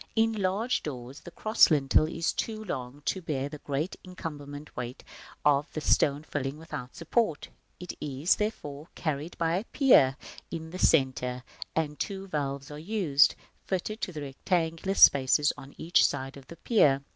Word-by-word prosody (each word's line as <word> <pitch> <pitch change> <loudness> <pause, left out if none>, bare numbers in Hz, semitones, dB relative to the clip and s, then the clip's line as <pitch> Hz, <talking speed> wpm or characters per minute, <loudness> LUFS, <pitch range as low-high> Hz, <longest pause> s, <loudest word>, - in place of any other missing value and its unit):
In 225 0 +3
large 205 +4 0
doors 130 -1 -7
the - - -11
cross 215 +5 +4
lintel 150 0 +3
is 165 +1 -1
too 220 -1 -3
long 135 -6 -6
to 190 - -1
bear 140 -5 -2
the 150 0 -8
great 145 +6 -3
incumbent 150 -5 -8
weight 125 +1 -6 0.4
of 145 0 +3
this 155 - +2
stone 145 +1 +1
filling 145 -2 -3
without 150 -6 -8
support; 170 -1 0 0.3
it 180 0 -6
is, 145 +4 +1
therefore, 155 -8 -4
carried 155 +1 -3
by 165 +1 +1
a 195 - -2
pier 140 - +5 0.3
in 160 -1 -6
the 185 - -6
centre; 125 -5 +2 0.3
and 150 -2 -1
two 195 -1 -3
valves 140 -4 -3
are 150 - -7
used, 160 -6 +3 0.3
fitted 205 +4 -2
to - - -2
the 155 -3 -6
rectangular 165 +6 -1
spaces 140 0 +6
on 140 -1 -12
each 170 +2 +3
side 135 +1 -1
of 135 -1 -13
the 170 - -10
pier. 145 - +3
150 Hz, 165 wpm, -28 LUFS, 140-180 Hz, 0.4 s, spaces